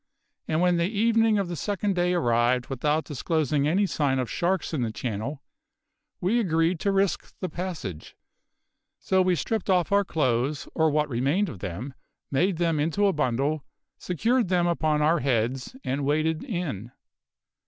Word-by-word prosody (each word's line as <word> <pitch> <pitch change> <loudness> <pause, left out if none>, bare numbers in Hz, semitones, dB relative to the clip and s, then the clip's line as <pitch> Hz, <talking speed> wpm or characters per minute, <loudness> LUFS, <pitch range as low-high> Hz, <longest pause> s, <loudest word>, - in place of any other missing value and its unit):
And 160 +1 +1
when 180 -1 +3
the 170 +2 +1
evening 225 0 +3
of 200 -2 0
the 175 - -4
second 205 +3 -1
day 180 0 +1
arrived 120 -4 +2
without 150 +4 0
disclosing 150 -1 0
any 190 +6 +2
sign 145 -6 0
of 125 -2 -2
sharks 175 -1 -1
in 145 - 0
the 115 -2 -1
channel, 120 +5 -4 0.8
we 200 +7 +1
agreed 165 -4 +1
to 200 - +1
risk 195 -2 0
the 185 - -3
passage; 160 - -6 0.8
so 190 0 +1
we 185 -1 +3
stripped 210 +6 -2
off 180 -2 +2
our 200 0 +4
clothes 140 -4 0
or 160 -1 +3
what 150 0 +1
remained 140 - 0
of 95 - -9
them 100 +9 -5 0.4
made 175 +6 +1
them 165 -3 +1
into 165 +7 +1
a 195 - +3
bundle, 140 +1 0 0.4
secured 225 - +1
them 175 -1 +2
upon 155 -3 +1
our 165 +3 +3
heads, 125 - -1
and 140 +2 -2
waded 155 +3 0
in. 155 - -4
160 Hz, 165 wpm, -26 LUFS, 135-185 Hz, 0.8 s, our